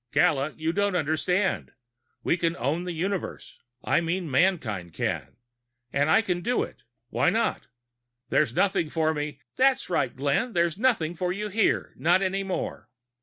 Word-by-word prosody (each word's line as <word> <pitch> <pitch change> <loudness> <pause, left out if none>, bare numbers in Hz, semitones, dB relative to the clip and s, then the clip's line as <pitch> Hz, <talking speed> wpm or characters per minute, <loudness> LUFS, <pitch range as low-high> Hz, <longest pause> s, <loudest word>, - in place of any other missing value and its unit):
"Gala, 155 -4 +2
you 160 +1 -1
don't 205 0 +1
understand. 175 +4 0 0.5
We - - +2
can 170 -1 0
own 150 +9 -1
the 180 - -3
Universe. 185 +3 -4 0.2
I - - +2
mean 170 -1 -2
mankind 130 - +1
can. - - -2 0.6
And 145 +2 +2
I 220 +8 +5
can 180 -4 -1
do 245 +6 +1
it. - - -10 0.3
Why - - +3
not? - - 0 0.6
There's 130 -6 +2
nothing 190 -5 +2
for 160 0 +1
me 150 -2 -4
" - - -61
"That's 260 -6 +3
right, 140 -7 0
Glenn. 145 - 0
There's 170 -2 +2
nothing 220 -10 +2
for 180 +1 -2
you 210 +3 -3
here. 215 +2 +1
Not 175 +4 +3
any 195 +1 0
more." 195 -1 -4
170 Hz, 165 wpm, -26 LUFS, 155-190 Hz, 0.6 s, I